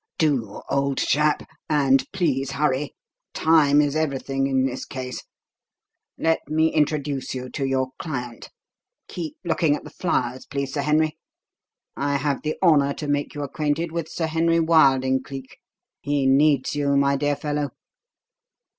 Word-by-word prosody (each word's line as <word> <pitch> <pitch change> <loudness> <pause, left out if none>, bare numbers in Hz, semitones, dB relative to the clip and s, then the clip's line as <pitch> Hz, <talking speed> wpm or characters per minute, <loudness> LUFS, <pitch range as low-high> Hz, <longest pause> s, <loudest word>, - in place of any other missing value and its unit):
"Do, 130 -10 0
old 140 -1 0
chap 150 0 +1 0.2
and 135 -3 +2
please 135 -8 0
hurry; 140 -1 0 0.4
time 150 -2 +4
is 145 0 0
everything 135 -3 -1
in 130 -1 +1
this 130 -1 -3
case. 130 -1 -6 1.0
Let 160 0 +2
me 160 +1 +2
introduce 145 -4 0
you 130 0 -5
to 140 - -3
your 130 -1 0
client. 125 -7 -5 0.6
(Keep 165 -4 -6
looking 165 -3 +2
at - - -8
the - - -11
flowers, 130 -7 -2
please, 140 -1 -3
Sir 145 - -1
Henry.) 155 +2 +1 0.8
I 140 0 -1
have 140 0 -1
the 155 0 -2
honour 145 -5 +4
to 150 - -5
make 145 0 -1
you 145 - -3
acquainted 150 +3 -2
with 165 -1 -3
Sir 165 - -2
Henry 165 +1 +2
Wilding, 135 -5 +4
Cleek; 135 0 -9 0.4
he 145 -1 0
needs 140 0 +3
you, 140 -1 +1
my 140 0 +3
dear 145 +1 0
fellow." 145 0 -2
145 Hz, 145 wpm, -23 LUFS, 135-155 Hz, 1.0 s, time